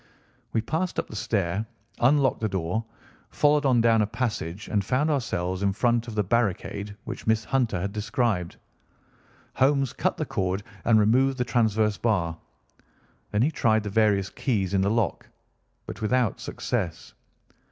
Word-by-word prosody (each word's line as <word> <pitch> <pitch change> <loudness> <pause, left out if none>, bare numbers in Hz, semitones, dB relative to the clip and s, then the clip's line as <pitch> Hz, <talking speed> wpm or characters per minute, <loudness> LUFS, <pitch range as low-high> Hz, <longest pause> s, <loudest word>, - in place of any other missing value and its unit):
We 115 - +1
passed 160 +10 -2
up - - -2
the - - -8
stair, 100 -2 -1 0.4
unlocked 135 +1 +3
the 110 - 0
door, 95 +3 -2 0.5
followed 150 -1 +3
on 125 -3 +4
down 115 -1 +4
a 105 - +1
passage, 105 -6 -3
and 100 -2 0
found 130 +9 +1
ourselves 95 -9 -1
in 100 -1 +1
front 120 +2 +1
of 115 - -6
the 105 - +2
barricade 100 -1 -1
which - - -7
Miss 110 0 +2
Hunter 125 -9 0
had 100 +3 -3
described. 105 -5 -1 1.0
Holmes 135 -1 +2
cut - - -1
the - - -2
cord 95 +1 -2 0.2
and 115 -2 +5
removed 130 +5 +3
the 125 - 0
transverse 110 -3 +1
bar. 90 -8 0 0.9
Then 105 +2 +1
he 150 - +2
tried 110 -7 +2
the 105 - -4
various 105 -3 +2
keys 100 -7 -1
in 95 - +3
the 100 - +2
lock, 115 -1 -1 0.6
but - - -8
without 120 0 +1
success. - - -4
110 Hz, 160 wpm, -26 LUFS, 100-125 Hz, 1.0 s, and